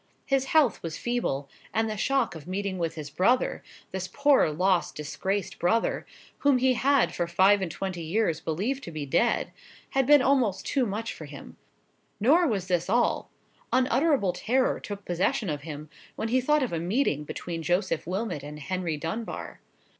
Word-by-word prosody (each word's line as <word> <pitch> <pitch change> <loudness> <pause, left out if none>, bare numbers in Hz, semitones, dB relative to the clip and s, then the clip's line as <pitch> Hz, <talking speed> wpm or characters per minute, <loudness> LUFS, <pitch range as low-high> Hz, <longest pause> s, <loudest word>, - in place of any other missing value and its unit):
His 270 -1 +1
health 280 -7 +3
was 165 -2 -5
feeble, 235 - -2 0.3
and 225 0 +2
the 215 - -3
shock 260 +3 +1
of 160 -1 -10
meeting 190 0 -3
with 165 -1 -2
his 150 -3 -7
brother—this 190 - -1
poor 280 - +3
lost 180 +3 +1
disgraced 190 +6 -3
brother—whom 230 +7 0
he 255 +1 +3
had 275 +2 +2
for 175 - -1
five 190 +4 +4
and 185 - -1
twenty 185 +1 -4
years 165 0 0
believed 200 - -2
to 170 - -7
be 155 -2 -4
dead, 170 - +1 0.4
had 270 -2 +1
been 290 -2 +7
almost 250 -9 +2
too 265 -4 +1
much 215 +3 -3
for 155 - -9
him. 140 -1 -11 0.6
Nor 320 - +4
was 200 -8 -1
this 175 -1 0
all—unutterable 255 - +1
terror 255 +5 +1
took 205 -1 -7
possession 185 - 0
of 145 -1 -4
him 150 0 -7 0.3
when 225 - -3
he 255 +2 +3
thought 300 +2 +3
of 245 - -3
a 165 - 0
meeting 175 - 0
between 165 +2 -5
Joseph 175 -1 0
Wilmot 185 -4 -2
and 150 +1 -8
Henry 170 0 -2
Dunbar. 170 +9 -5
195 Hz, 165 wpm, -27 LUFS, 170-250 Hz, 0.6 s, been